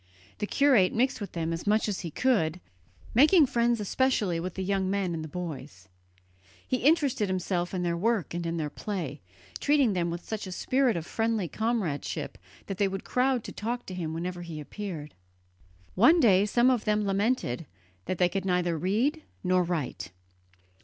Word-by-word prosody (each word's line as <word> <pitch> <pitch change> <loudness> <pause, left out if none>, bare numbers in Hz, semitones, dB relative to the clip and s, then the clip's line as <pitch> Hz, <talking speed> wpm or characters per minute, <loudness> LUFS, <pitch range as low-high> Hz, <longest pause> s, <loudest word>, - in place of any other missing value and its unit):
The 210 - -2
curate 255 -10 +4
mixed 250 0 +1
with 205 - -6
them 165 -1 -2
as 165 +4 -5
much 215 +2 +3
as 205 -3 -2
he 170 - -5
could, 180 - +1 0.5
making 305 +6 +6
friends 235 -2 +1
especially 210 -5 +1
with 180 +1 -5
the 190 - -3
young 190 0 0
men 195 -3 0
and 160 -1 -4
the - - -6
boys. 145 - -7 0.8
He 255 - +1
interested 275 - +2
himself 180 -1 -1
in 180 -2 -2
their 170 -1 0
work 205 -1 0
and 175 0 -3
in 165 0 -2
their 150 -2 -2
play, 170 -9 -5 0.4
treating 280 -7 +3
them 175 -2 0
with 170 +1 -5
such 215 -3 -4
a - - -6
spirit 255 +4 +1
of 160 - -4
friendly 225 -3 -1
comradeship 215 -7 -2 0.3
that 195 -2 -6
they 200 - +3
would 195 0 -4
crowd 255 -2 +1
to - - -7
talk 240 +3 -4
to 185 - -7
him 170 -3 -3
whenever 175 +2 -4
he 165 -3 -7
appeared. 155 -2 -6 0.8
One 255 - +6
day 205 - +5
some 240 +4 +4
of 245 -4 0
them 210 -1 +1
lamented 195 - 0 0.4
that 185 - -2
they 180 - +4
could 195 +1 -3
neither 180 -3 0
read 230 - +1 0.2
nor 185 0 +3
write. 165 - -3
195 Hz, 180 wpm, -28 LUFS, 170-235 Hz, 0.8 s, making